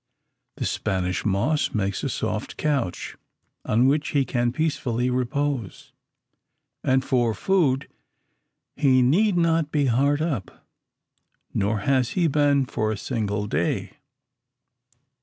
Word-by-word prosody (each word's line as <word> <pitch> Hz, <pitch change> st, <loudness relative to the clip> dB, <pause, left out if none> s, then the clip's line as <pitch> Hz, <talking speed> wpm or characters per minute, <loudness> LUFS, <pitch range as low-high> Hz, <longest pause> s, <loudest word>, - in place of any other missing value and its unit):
The -, -, -2 dB
Spanish 90 Hz, -1 st, -1 dB
moss 115 Hz, +11 st, +1 dB
makes 100 Hz, -2 st, -1 dB
a -, -, -1 dB
soft -, -, -3 dB
couch, 140 Hz, -12 st, -2 dB, 0.5 s
on 115 Hz, +4 st, +2 dB
which 145 Hz, +3 st, +2 dB
he 140 Hz, -2 st, +2 dB
can 120 Hz, -1 st, 0 dB
peacefully 125 Hz, -5 st, -1 dB
repose. 130 Hz, -, -2 dB, 0.9 s
And 130 Hz, 0 st, +2 dB
for 120 Hz, -4 st, +1 dB
food 145 Hz, -, +1 dB, 0.9 s
he 130 Hz, -3 st, +4 dB
need 180 Hz, -, +3 dB
not 165 Hz, -3 st, +2 dB
be 145 Hz, -2 st, +2 dB
hard 140 Hz, +4 st, +2 dB
up, 145 Hz, -, -4 dB, 0.9 s
nor 105 Hz, +1 st, 0 dB
has 130 Hz, 0 st, +1 dB
he 175 Hz, -, +3 dB
been 145 Hz, -2 st, +3 dB
for 110 Hz, -3 st, -1 dB
a 110 Hz, -, -3 dB
single 105 Hz, -3 st, -2 dB
day. 85 Hz, -3 st, -1 dB
130 Hz, 120 wpm, -24 LUFS, 110-145 Hz, 0.9 s, he